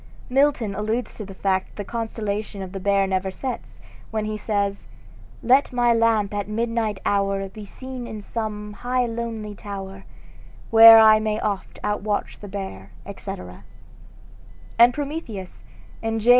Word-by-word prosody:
Milton 270 -6 +2
alludes 220 +4 -2
to 215 - -7
the 195 - -10
fact 190 -1 0
that - - -22
the 205 - -4
constellation 215 -2 -4
of 185 - -8
the 195 - -5
Bear 200 0 +2
never 190 0 -1
sets, 245 +6 -6 0.3
when 215 -1 -2
he 215 0 -3
says: 200 -2 -2 0.6
"Let 260 +4 +4
my 240 -1 +3
lamp 225 -3 +2
at 205 -1 -2
midnight 225 -2 -1
hour 195 -1 +1
Be 210 +2 -10
seen 255 +3 -8
in 215 -3 -7
some 210 -1 -4
high 245 +4 0
lonely 225 -2 -4
tower, 195 -1 -8 0.7
Where 225 0 +11
I 220 -1 +7
may 215 0 -1
oft 200 -2 -3
outwatch 210 0 -2
the 205 - -9
Bear," 190 - -6 0.2
etc. 90 0 -8 1.2
And 240 +1 +8
Prometheus, 275 - -6 0.4
in 225 0 -1
J. 225 +3 0
215 Hz, 150 wpm, -23 LUFS, 200-230 Hz, 1.2 s, Where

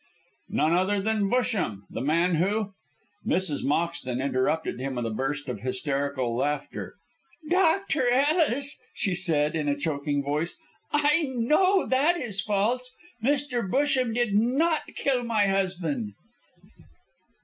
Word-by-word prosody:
"None 155 +3 +2
other 190 +3 +2
than 210 0 0
Busham, 210 - 0
the - - -4
man 165 +5 +2
who 200 +4 0 0.3
" 205 0 -19
Mrs. 175 -6 0
Moxton 145 -5 -1
interrupted 135 +3 0
him 135 0 -3
with 120 -1 -2
a 115 - -2
burst 135 +6 -3
of 125 - -4
hysterical 130 -1 -2
laughter. 145 +3 -3 0.5
"Dr. 330 -5 +2
Ellis," 285 +1 +2
said 165 -6 +2
she, - - -1
in 150 -1 -1
a 145 - 0
choking 145 -1 -1
voice, 150 +4 -2 0.3
"I 295 +2 +3
know 365 +11 +3
that 290 +7 +2
is 210 - -3
false. 230 +6 -1 0.3
Mr. 265 -5 0
Busham 260 -1 +2
did 240 -4 +1
not 275 +10 +2
kill 260 -3 +1
my 225 -3 +2
husband." 175 - -1
195 Hz, 130 wpm, -26 LUFS, -, 0.5 s, I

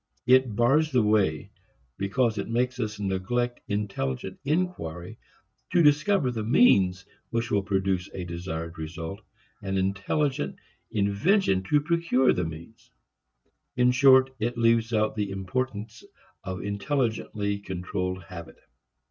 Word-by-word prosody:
It 130 -3 +4
bars 140 +7 +3
the 125 -4 +3
way 100 -8 +1 0.5
because 110 +2 0
it 100 - -4
makes 125 +2 0
us 105 -3 -3
neglect 110 +6 -1
intelligent 95 - -3
inquiry 140 - -3 0.5
to 175 - +5
discover 150 0 +3
the 110 -3 -3
means 95 - +4 0.2
which 115 -1 -2
will 100 - +2
produce 95 -2 -1
a 90 - -5
desired 85 -1 -6
result, 85 +5 -6 0.4
and 95 -1 -2
intelligent 100 - -1 0.3
invention 100 - +2
to 150 -1 +4
procure 165 -5 +2
the 90 - -1
means. 80 +7 -10 0.9
In 125 0 +4
short, 130 +1 +6
it 120 +3 -2
leaves 115 0 +3
out 110 -1 +1
the 105 -2 -2
importance 105 +3 -4 0.4
of 95 -1 -5
intelligently 105 -2 -2
controlled 95 -1 -4
habit. 85 -1 -10
105 Hz, 120 wpm, -26 LUFS, 95-125 Hz, 0.9 s, short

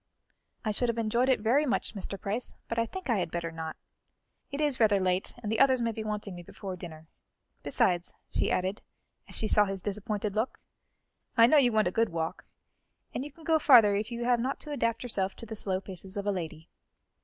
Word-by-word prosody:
"I 215 - +1
should 240 +3 0
have 235 - -1
enjoyed 235 +3 +1
it 260 - +3
very 245 +7 +3
much, 255 - 0
Mr. 195 -1 -3
Price, 215 +4 -3
but 230 - -1
I 230 - +1
think 375 +7 -7
I 230 -5 +2
had 175 -2 -1
better 170 0 -3
not; 160 -1 -5 0.7
it 280 - -5
is 295 -4 +1
rather 215 -3 +5
late, 185 0 +1
and 210 - -2
the 225 - 0
others 265 -2 +5
may 230 -1 0
be 220 0 -5
wanting 210 -2 -4
me 175 - -8
before 185 +2 -7
dinner. 160 -3 -9 0.6
Besides," 175 -1 +1 0.2
she - - +1
added, 185 +3 -1 0.5
as - - -6
she 220 - -1
saw 210 0 +5
his 195 -2 -4
disappointed 210 0 -2
look, 220 +4 -1 0.8
"I 230 - +9
know 300 +6 +5
you 255 -4 +5
want 215 -3 +3
a - - 0
good 225 +3 +2
walk, 165 -1 -3 0.7
and 255 - -2
you 295 - -8
can 325 +4 -17
go 320 -1 +3
further 230 -9 +7
if 210 +4 -2
you 235 0 -3
have 245 -1 +3
not 260 +4 -2
to 300 - -7
adapt 230 -4 0
yourself 195 -6 -1
to - - -9
the 220 0 -6
slow 190 -3 -1
paces 190 +1 -8
of 200 - -3
a 205 - +2
lady." 165 -3 -5
215 Hz, 225 wpm, -29 LUFS, 190-240 Hz, 0.8 s, I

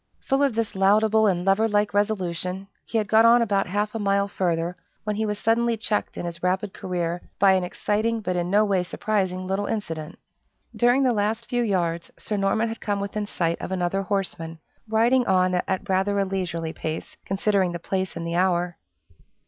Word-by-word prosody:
Full 270 +1 +1
of 275 -5 +2
this 230 -1 -1
laudable 215 +3 +4
and 180 -2 0
lover 195 +3 +3
like 205 -1 +1
resolution, 190 -2 -1 0.2
he 230 - -1
had 215 -2 0
got 220 +2 +5
on 235 +1 +6
about 200 -3 +1
half 205 +3 -1
a 225 - -3
mile 200 -1 +1
further, 175 -3 -1 0.3
when 210 -1 -2
he 220 +1 -1
was 210 0 -2
suddenly 230 +2 +1
checked 215 -1 -2
in - - -4
his 170 0 -6
rapid 185 +2 0
career 175 -1 -3 0.2
by 195 -1 +5
an 185 -1 +2
exciting, 215 +5 -1
but 185 -4 -2
in 175 0 -1
no 210 +3 +4
way 195 -3 +2
surprising, 185 0 -1
little 195 +2 -1
incident. 165 -8 -4 0.6
During 245 +3 +3
the 255 -2 +3
last 220 +2 -1
few 245 -1 0
yards, 170 -6 -1
Sir 215 - -4
Norman 205 +3 +1
had 225 0 -6
come 205 -1 -1
within 205 +1 -3
sight 170 -4 -1
of - - -5
another 185 +1 0
horseman, 180 -4 -3 0.3
riding 235 +3 +3
on 185 -1 +3
at 190 +2 -1
rather 195 +1 +1
a 200 - +2
leisurely 175 -4 -3
pace, 160 0 -5
considering 195 -1 +1
the 175 - -3
place 190 +2 -3
and 170 0 -4
the 170 - -3
hour. 175 -1 +1
195 Hz, 195 wpm, -24 LUFS, 180-215 Hz, 0.6 s, on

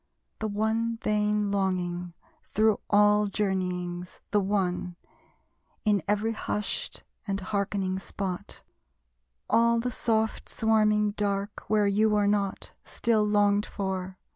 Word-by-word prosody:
The 220 - -1
one 220 +2 0
vain 210 -1 +1
longing, 180 -3 -1 0.3
through 215 0 +2
all 210 0 +5
journeyings, 180 -3 -2
The 210 - +4
one: 185 -3 -1 0.9
in 205 -2 +3
every 210 +2 +1
hushed 210 -1 -2 0.2
and 195 0 -1
hearkening 195 -1 -1
spot, 190 -2 -5 0.8
All 235 0 +4
the 250 +2 -2
soft 220 -1 -1
swarming 215 -2 +2
dark 205 0 -2
where 210 -1 +3
you 210 +2 +3
were 210 -1 +2
not, 200 -1 -1
Still 225 -2 +1
longed 205 0 +2
for! 190 -2 -4
205 Hz, 115 wpm, -28 LUFS, 190-215 Hz, 0.9 s, all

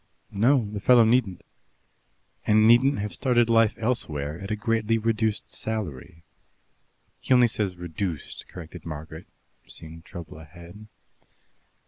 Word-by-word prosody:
"No, 115 +3 +3
the 105 - -4
fellow 120 +3 +6
needn't." 110 -6 +1 0.5
" - - -33
and 110 0 +5
needn't 130 +5 +5
have 105 0 -4
started 120 -3 +2
life 115 -1 +4
elsewhere 80 - -2
at 100 - -7
a 110 - 0
greatly 115 0 0
reduced 110 -2 -1
salary." 85 -7 -6 1.0
"He - - -8
only 125 -1 +6
says 105 -5 -2
'reduced,'" 85 -2 -5
corrected 85 -1 -10
Margaret, 80 +1 -8 0.4
seeing 80 +1 -9
trouble 80 -2 -10
ahead. 85 +6 -13
105 Hz, 125 wpm, -25 LUFS, 85-115 Hz, 1.0 s, fellow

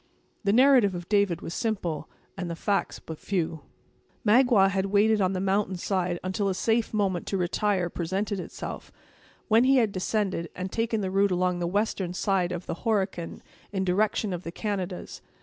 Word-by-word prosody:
The 200 - +2
narrative 245 -5 +5
of 175 -1 -6
David 200 -5 +2
was 165 - -6
simple, 175 -10 -2 0.3
and 180 -3 -4
the 170 - -3
facts 200 +3 -1
but 160 -1 -9
few. 165 -5 -2 0.6
Magua 225 -3 +5
had 195 0 0
waited 210 +2 +3
on 185 0 +2
the 185 - -1
mountain 195 0 0 0.5
until 190 +2 -1
a 190 - -1
safe 225 +3 +1
moment 195 -5 0
to 195 - -1
retire 185 +1 0
presented 190 +4 -2
itself, - - -7 0.6
when 225 +1 +5
he 270 +1 +5
had 225 -5 +3
descended, 190 -3 -1
and 185 +1 -4
taken 225 -1 0
the 190 -1 -2
route 200 +1 +3
along 180 -1 +1
the 175 - -1
western 190 -2 -1
side 185 -2 +1
of 175 0 -4
the - - -4
Horican 195 -7 -1 0.3
in 190 -2 -1
direction 205 +2 +1
of 175 - -4
the 165 - -6
Canadas. 190 -2 -4
195 Hz, 175 wpm, -27 LUFS, 180-210 Hz, 0.6 s, narrative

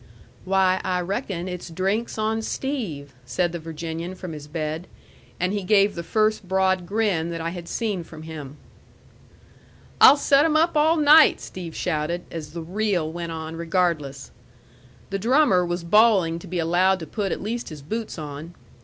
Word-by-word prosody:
"Why, 190 0 +2
I 180 -1 0
reckon 190 -1 -3
it's 180 -1 -6
drinks 195 +8 -1
on 220 +1 0
Steve," 210 - -4
said 170 +8 -1
the 170 - -5
Virginian 165 +2 -6
from 180 -3 -7
his 150 -1 -9
bed. 155 +2 -4 0.5
And 180 +2 0
he 205 - -1
gave 200 +1 +3
the 170 - -5
first 215 +2 0
broad 190 -1 +1
grin 195 -5 0
that 170 -1 -4
I 165 +1 -3
had 175 -1 -8
seen 210 -6 -2
from 160 -1 -11
him. 150 -3 -8 1.4
"I'll 280 - +9
set 280 0 +4
'em 310 -1 +3
up 325 +1 +2
all 315 +2 +4
night!" 305 +1 +7
Steve 170 -3 -8
shouted, 170 0 -2
as 155 -2 -7
the 170 -1 -5
reel 185 -3 -1
went 170 0 -5
on 160 0 -6
regardless. 165 -5 -1 0.8
The 195 - -1
drummer 235 -4 +4
was 175 0 -3
bawling 185 -3 +4
to 185 - -11
be 180 +1 -4
allowed 175 +3 +3
to - - -5
put 195 +5 -3
at - - -2
least 230 +4 -4
his 150 -3 -10
boots 220 +7 -4
on. 155 +2 -7
180 Hz, 170 wpm, -24 LUFS, 165-210 Hz, 1.4 s, I'll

